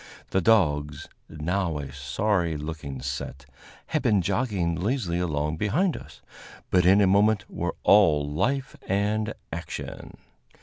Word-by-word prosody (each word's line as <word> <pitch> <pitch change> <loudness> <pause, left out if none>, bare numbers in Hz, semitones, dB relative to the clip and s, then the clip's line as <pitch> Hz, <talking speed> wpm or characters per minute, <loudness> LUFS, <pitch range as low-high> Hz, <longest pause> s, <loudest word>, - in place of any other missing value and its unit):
The 95 - +2
dogs, 75 -9 +2 0.2
now 85 +2 -1
a 70 -2 -6
sorry 80 +5 0
looking 75 -4 -6
set, 70 0 -5 0.4
had 155 - -1
been 105 -7 +2
jogging 100 -4 0
lazily 95 -2 -1
along 75 -3 -1
behind 150 - +1
us, - - -11 0.5
but 90 -1 +4
in 100 +2 +6
a - - +5
moment 100 +2 +3
were - - -3
all 80 -8 +5
life 130 - -1
and 105 +3 0 0.2
action. - - -7
90 Hz, 130 wpm, -26 LUFS, 75-105 Hz, 0.5 s, in